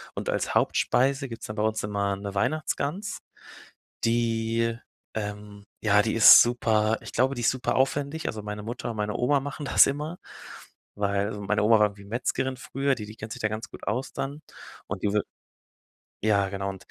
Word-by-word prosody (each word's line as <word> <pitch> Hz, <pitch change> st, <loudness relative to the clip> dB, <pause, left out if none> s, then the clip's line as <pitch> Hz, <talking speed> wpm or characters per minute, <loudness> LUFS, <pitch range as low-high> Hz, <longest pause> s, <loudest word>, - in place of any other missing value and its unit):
Und -, -, -4 dB
als -, -, -1 dB
Hauptspeise 135 Hz, +1 st, +2 dB
gibt's 115 Hz, -1 st, -7 dB
dann 105 Hz, -, -6 dB
bei -, -, 0 dB
uns 110 Hz, 0 st, 0 dB
immer 100 Hz, -1 st, -1 dB
'ne 100 Hz, 0 st, -6 dB
Weihnachtsgans, 155 Hz, -, -1 dB, 0.9 s
die, 115 Hz, 0 st, +1 dB, 0.4 s
ähm 105 Hz, -1 st, -6 dB, 0.2 s
ja, 105 Hz, -1 st, +5 dB
die 110 Hz, +1 st, -1 dB
ist 115 Hz, -, +10 dB
super 110 Hz, -2 st, +2 dB
ich -, -, -9 dB
glaube, 130 Hz, +3 st, +2 dB
die 120 Hz, -, -4 dB
ist 120 Hz, -, +3 dB
super 130 Hz, -1 st, -2 dB
aufwendig, 140 Hz, +3 st, 0 dB
also 110 Hz, -, -4 dB
meine 105 Hz, 0 st, -6 dB
Mutter 120 Hz, +2 st, -5 dB
und 110 Hz, -, -8 dB
meine 105 Hz, 0 st, -1 dB
Oma 140 Hz, +3 st, +2 dB
machen 145 Hz, +2 st, -6 dB
das -, -, +6 dB
immer, 150 Hz, +5 st, -3 dB, 0.8 s
weil 100 Hz, 0 st, 0 dB
so 105 Hz, -, -6 dB
meine 105 Hz, +2 st, 0 dB
Oma 115 Hz, +2 st, +6 dB
war 105 Hz, -, +6 dB
irgendwie 100 Hz, 0 st, -13 dB
Metzgerin 125 Hz, +4 st, -2 dB
früher, 135 Hz, +1 st, -1 dB
die 105 Hz, -, -7 dB
die 105 Hz, +1 st, -11 dB
kennt 110 Hz, 0 st, -8 dB
sich -, -, -9 dB
da 110 Hz, -, +2 dB
ganz 110 Hz, +1 st, -5 dB
gut -, -, -12 dB
aus 125 Hz, +5 st, -2 dB
dann 140 Hz, +3 st, -4 dB, 0.5 s
und 95 Hz, -1 st, -5 dB
die 105 Hz, -, +1 dB
wir 105 Hz, -, +3 dB, 1.0 s
ja 100 Hz, -2 st, +2 dB
genau 95 Hz, 0 st, -4 dB
110 Hz, 190 wpm, -26 LUFS, 105-130 Hz, 1.0 s, ist